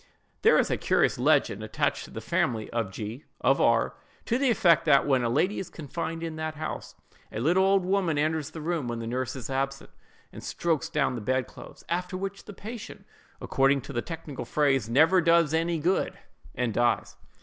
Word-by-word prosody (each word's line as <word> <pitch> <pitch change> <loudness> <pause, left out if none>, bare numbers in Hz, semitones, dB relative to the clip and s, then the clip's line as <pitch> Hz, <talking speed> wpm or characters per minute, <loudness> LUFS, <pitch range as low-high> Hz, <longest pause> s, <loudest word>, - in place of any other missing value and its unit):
There - - +6
is - - +2
a - - +1
curious - - +2
legend - - +2
attached - - -1
to - - -13
the - - -7
family 110 -3 -1
of 115 -4 -1
G——, 110 +7 -6 0.2
of - - +3
R——, - - +3 0.3
to 240 +2 0
the 275 -1 +3
effect 175 -7 +4
that, 140 - +5
when 135 -3 +3
a 120 - +1
lady 170 - +1
is 190 - -5
confined 165 +2 -5
in 160 -1 -4
that 155 0 -3
house, 155 +1 -6 0.4
a - - -4
little 175 +10 +3
old 195 -1 +3
woman 185 -5 +1
enters 155 0 0
the 160 0 -8
room 160 -4 -2
when 120 -1 -3
the 115 - -5
nurse 130 +2 -2
is 125 -4 -6
absent, 135 +1 -3 0.4
and - - -9
strokes 165 -1 -1
down 150 -5 +1
the 120 - -4
bed 130 +4 0
clothes; - - -13
after 180 +2 -2
which 195 +1 -5
the 205 - -9
patient, 220 +3 -9 0.3
according 135 +1 +2
to 140 +2 -9
the 120 - -1
technical 160 -3 -6
phrase, 135 -6 +1
"never 160 +9 +5
does 170 -2 +4
any 165 +1 +1
good," 175 +5 0 0.4
and 120 -2 -1
dies. 120 +1 +1
155 Hz, 200 wpm, -27 LUFS, 130-170 Hz, 0.4 s, There